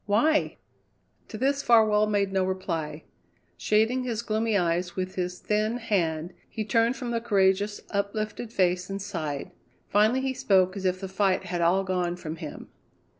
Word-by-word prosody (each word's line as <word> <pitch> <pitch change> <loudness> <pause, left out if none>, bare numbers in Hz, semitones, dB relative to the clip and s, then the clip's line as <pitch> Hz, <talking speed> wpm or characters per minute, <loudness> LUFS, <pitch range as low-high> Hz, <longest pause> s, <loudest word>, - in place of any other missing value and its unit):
Why?" 300 +10 +2 0.7
To 215 - -7
this 275 +4 +1
Farwell 215 -3 +4
made 200 -2 0
no 190 -1 +2
reply. 165 -5 -3 0.5
Shading 225 +4 +1
his 235 -2 -3
gloomy 220 -1 +1
eyes 175 0 0
with 185 0 -3
his 180 0 -3
thin 215 +4 0
hand, 175 -7 -1 0.2
he 215 -2 -4
turned 230 +4 +2
from 245 -3 -4
the 230 -1 -1
courageous, 200 -2 +2
uplifted 215 +3 -3
face 180 -3 +1
and 195 0 -3
sighed. 160 -8 -4 0.4
Finally 215 +6 +3
he 265 0 -1
spoke 190 -5 +2
as 195 -1 -5
if 185 0 +1
the 190 - -5
fight 190 0 +1
had 180 -2 -3
all 180 +3 +3
gone 180 -2 -1
from 165 -2 -6
him. 155 -2 -8
200 Hz, 165 wpm, -27 LUFS, 180-220 Hz, 0.7 s, Farwell